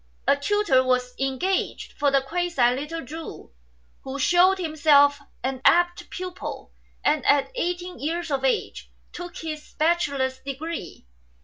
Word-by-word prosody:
A - - +5
tutor 285 -3 +2
was 250 -1 0
engaged 270 +9 -1
for 290 -1 +1
(the 275 0 +3
quasi) 335 -5 +1
little 295 +3 -5
Chu, 305 - -9 0.5
who 265 +1 -5
shewed 355 +6 +4
himself 290 -4 +4 0.2
an 260 0 -2
apt 350 +1 +3
pupil, 365 -1 -6 0.3
and 300 -1 +2
at 285 -1 +3
eighteen 355 -6 -3
years 330 +2 -3
of 270 -1 -1
age 265 - -1 0.2
took 350 -1 -7
his 310 -2 -7
bachelor's 280 -5 +1
degree. 275 - -6
300 Hz, 130 wpm, -24 LUFS, 270-350 Hz, 0.5 s, A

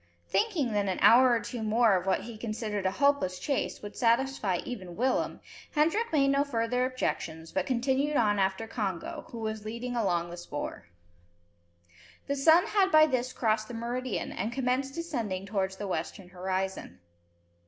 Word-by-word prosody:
Thinking 345 - +1
that 205 -1 0
an 185 - -1
hour 255 +3 +8
or 235 -1 +3
two 225 +2 -6
more 220 -1 +3
of 185 +1 -2
what 190 - +2
he 230 +2 -8
considered 215 -3 -3
a - - +1
hopeless 280 -10 +2
chase, 275 -2 -2
would 205 - -8
satisfy 235 -5 +1
even 185 -8 -7
Willem, 255 +5 0 0.3
Hendrik 330 +10 +2
made 275 -3 +3
no 280 +1 +3
further 250 -2 0
objections, 165 -10 -3
but 190 - -1
continued 265 +4 +1
on 205 -3 +3
after 190 +3 0
Congo, 200 -6 -4
who 235 - -8
was 220 -1 -4
leading 235 +3 -5
along 175 -6 0
the 175 - -7
spoor. 145 - -6 1.4
The 280 - -1
sun 320 +5 +5
had 390 -2 +2
by 310 0 +8
this 255 -4 -1
crossed 220 -3 0
the 240 - -7
meridian, 235 -3 -3
and 210 +5 -3
commenced 265 +2 -1
descending 235 - -3
towards 195 -2 -2
the 205 - -5
western 180 +2 -4
horizon. 185 - -3
230 Hz, 165 wpm, -29 LUFS, 190-265 Hz, 1.4 s, hour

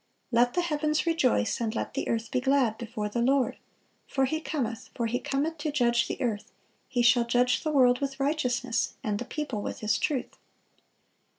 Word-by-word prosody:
(452) - - -1
"Let 245 +1 +4
the 350 -1 +1
heavens 305 0 0
rejoice, 255 -10 +1
and 225 0 -1
let - - -3
the - - -2
earth 230 0 -2
be 255 -2 +1
glad... 265 -4 +2
before 215 -2 -4
the 235 +3 -2
Lord: 265 +1 +2 0.5
for 270 -1 +1
He 315 +4 -2
cometh, 245 -7 -3
for 235 - -1
He 235 +2 -1
cometh 300 +4 -2
to 300 0 -2
judge 240 -4 +2
the - - -4
earth: 220 -5 -2 0.4
He 245 -2 0
shall 240 0 +5
judge 245 +1 +2
the 315 - -2
world 255 -4 +4
with 275 -1 -3
righteousness, 260 -4 0
and 205 -1 -1
the 245 - -4
people 280 -7 -4
with - - -5
His 215 0 +1
truth." 300 -8 -2
250 Hz, 195 wpm, -28 LUFS, 235-285 Hz, 0.5 s, shall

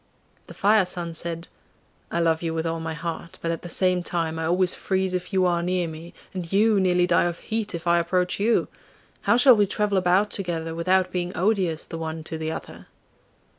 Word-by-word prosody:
The - - -11
Fire 205 -2 +3
son 170 -2 -3
said, 165 +1 -3 0.6
'I 170 - -1
love 165 -1 +2
you 165 -1 -2
with 160 0 -2
all 165 0 -1
my 160 0 -4
heart, 170 0 -6
but 165 - -2
at 165 - -3
the 175 - -8
same 185 0 +2
time 165 -2 -2
I 160 - -2
always 180 +1 +2
freeze 190 -1 -1
if 180 +2 -3
you 190 -2 +2
are 175 -1 +2
near 180 0 0
me, 160 +2 -9 0.2
and 180 -3 -5
you 210 +1 +4
nearly 180 -1 +3
die 175 -1 +3
of 175 -1 -2
heat 220 -4 -3
if 170 - -7
I 170 0 +4
approach 180 +2 0
you! 225 +3 +2 0.5
How 235 - +3
shall 250 0 +7
we 205 -2 +3
travel 205 0 +1
about 185 +3 +2
together 165 -4 -3
without 185 +2 +1
being 180 -1 -3
odious 185 -4 +1
the 165 - -7
one 160 0 -4
to 160 0 -6
the 160 0 -2
other? - - -8
175 Hz, 210 wpm, -24 LUFS, 165-190 Hz, 0.6 s, shall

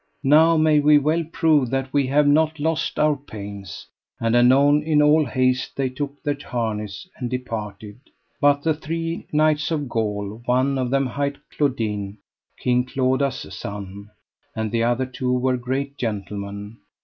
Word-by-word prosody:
Now 160 +4 +5
may 155 -1 +4
we 150 +1 +6
well 155 +4 +1
prove 150 -7 +2
that 135 +1 -2
we 140 -2 +2
have 145 +2 +3
not 155 +2 +3
lost 160 +1 -1
our 150 -1 +3
pains. 100 -7 -9 0.3
And 115 0 +1
anon 140 +4 +5
in 155 -1 +2
all 150 +1 +5
haste 130 -1 0
they 135 -1 0
took 140 +2 -6
their 145 -2 -1
harness 105 - -4
and 125 -3 -4
departed. 110 -4 -6 0.4
But 145 0 +3
the 160 - +2
three 165 +2 -4
knights 150 0 +2
of 150 -4 -2
Gaul, 105 -2 -3
one 130 +2 +2
of 125 -1 -1
them 135 +1 +1
hight 140 +3 -2 0.2
Claudine, 110 -8 -1 0.4
King 125 0 +1
Claudas' 130 -3 -1
son, 100 +1 -7 0.5
and 110 -1 -2
the 115 -1 +1
other 120 +2 +1
two 130 0 -2
were 130 +1 +1
great 135 +3 -3
gentlemen. 100 -1 -5
130 Hz, 155 wpm, -22 LUFS, 115-145 Hz, 0.5 s, we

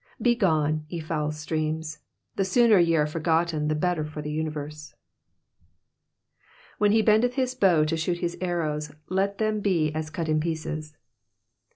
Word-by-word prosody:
Begone, 155 -10 +2
ye 170 - -4
foul 155 -1 -2
streams, 155 0 -3 0.4
the 195 - +1
sooner 220 +1 +4
ye 165 -1 +3
are 150 -2 +3
forgotten 160 0 0
the 155 - +1
better 175 0 0
for 155 0 -7
the 150 - -4
universe. 150 -1 -5 1.8
''When 210 -1 +4
he 220 +1 +4
l>endeth 225 +4 +3
his 255 -2 0
bow 180 -10 +3
to 160 +2 -1
shoot 170 +2 -1
his 175 -1 -3
arrows, 155 -4 -2 0.2
let 195 +2 0
them 215 -1 0
he 165 -6 +1
as 155 0 -3
cut 165 -1 -4
in 155 0 +2
pieces.'' 155 -1 -4
160 Hz, 155 wpm, -26 LUFS, 155-190 Hz, 1.8 s, sooner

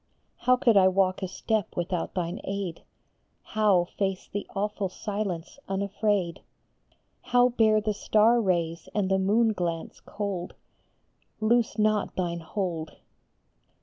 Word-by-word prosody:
How 250 +1 +4
could 235 -4 +4
I 190 -1 +7
walk 185 0 +2
a 190 - -1
step 215 +2 -2
without 175 0 -2
thine 175 -2 -2
aid? 195 -4 -4 0.6
How 210 -5 +3
face 195 +1 -3
the 205 - -5
awful 205 -1 -1
silence 200 +1 -4
unafraid? 200 -2 0 0.8
How 245 0 +4
bear 220 -3 +3
the 215 0 -1
star 220 +3 +3
rays 170 -4 -1
and 195 -2 +1
the 190 - +3
moon 220 +4 +3
glance 170 -4 -3
cold? 200 -4 -5 0.8
Loose 230 +1 +2
not 215 -1 +1
thine 170 -2 -2
hold 165 -2 -4
200 Hz, 125 wpm, -27 LUFS, 180-215 Hz, 0.8 s, I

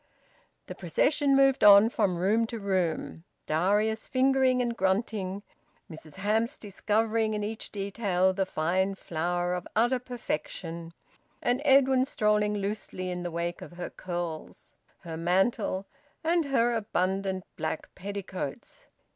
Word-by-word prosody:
The - - -7
procession 275 - +2
moved 270 -1 +4
on 205 +2 +8
from 200 -7 +1
room 215 +6 +2
to 230 - -5
room, 185 -5 -2 0.2
Darius 210 +7 +1
fingering 260 -1 +3
and 240 -1 0
grunting, 195 -1 -1 0.5
Mrs 155 -1 -11
Hamps 220 +7 0
discovering 215 +2 0
in 210 - -2
each 220 +1 -5
detail 195 -2 0
the 190 0 -1
fine 190 +4 0
flower 175 +1 -2
of 180 0 -4
utter 240 +4 +3
perfection, 170 -8 -5 0.4
and 245 +3 0
Edwin 265 -2 +5
strolling 210 -4 +1
loosely 200 -2 -4
in 180 0 -4
the 175 - -3
wake 170 +1 -3
of - - -10
her 175 0 -6
curls, 175 -3 -6 0.3
her 165 -2 -6
mantle, 190 +3 +1 0.4
and 335 0 +2
her 240 -4 +2
abundant 190 -3 -1
black 160 0 -4
petticoats. 190 -6 -6
200 Hz, 130 wpm, -28 LUFS, 180-230 Hz, 0.5 s, on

